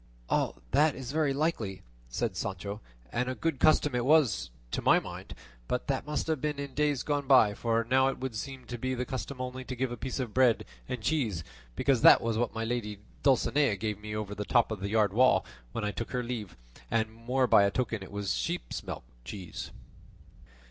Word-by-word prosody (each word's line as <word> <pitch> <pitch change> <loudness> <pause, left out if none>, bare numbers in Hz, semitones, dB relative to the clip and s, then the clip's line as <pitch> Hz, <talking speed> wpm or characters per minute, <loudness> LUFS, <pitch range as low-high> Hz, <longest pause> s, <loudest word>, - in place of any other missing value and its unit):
"That 150 0 +4
is 130 -1 -6
very 150 -2 +2
likely," 135 - -1 0.3
said 100 - -2
Sancho, 100 +3 -4 0.3
"and 125 +1 -1
a 130 - -2
good 160 -3 -1
custom 150 -2 +4
it 125 -1 +1
was, 135 - +3 0.2
to - - -1
my - - +5
mind; - - -8 0.3
but 125 - -1
that 135 +1 -2
must 150 - -1
have 160 -4 -1
been 150 -1 -1
in 140 -1 -5
days 145 -2 +1
gone 145 -2 -1
by, 125 -6 +6
for 115 +2 0
now 130 +3 +3
it 135 - -1
would 130 -2 -4
seem 130 +4 -6
to 120 -1 -6
be 130 +2 -1
the 125 0 -2
custom 130 +1 -5
only 130 0 -4
to 130 0 -5
give 130 0 -1
a 120 - -4
piece 130 +3 -4
of 120 -5 -3
bread 130 -3 +4 0.2
and 125 -4 -4
cheese; 115 - 0 0.3
because 135 - +2
that - - +9
was 115 -1 -1
what 115 0 0
my 115 0 -2
lady 110 -3 -2 0.2
Dulcinea 135 -2 +3
gave 105 +1 -3
me 105 0 -6
over 105 -1 -3
the 105 0 -3
top 120 +2 +3
of 110 - -3
the 100 +1 -3
yard 105 -2 +2
wall 130 +3 +4 0.3
when - - -3
I 105 - 0
took 115 - -5
leave 120 -3 -2
of - - -22
her; - - -27 0.2
and 110 -1 0
more 125 +3 0
by 100 -4 +6
token 115 -1 -2
it 95 - -9
was 100 -1 -1
sheep's - - -3
milk - - -6 0.2
cheese." 90 +7 -7
120 Hz, 210 wpm, -30 LUFS, 105-135 Hz, 0.3 s, that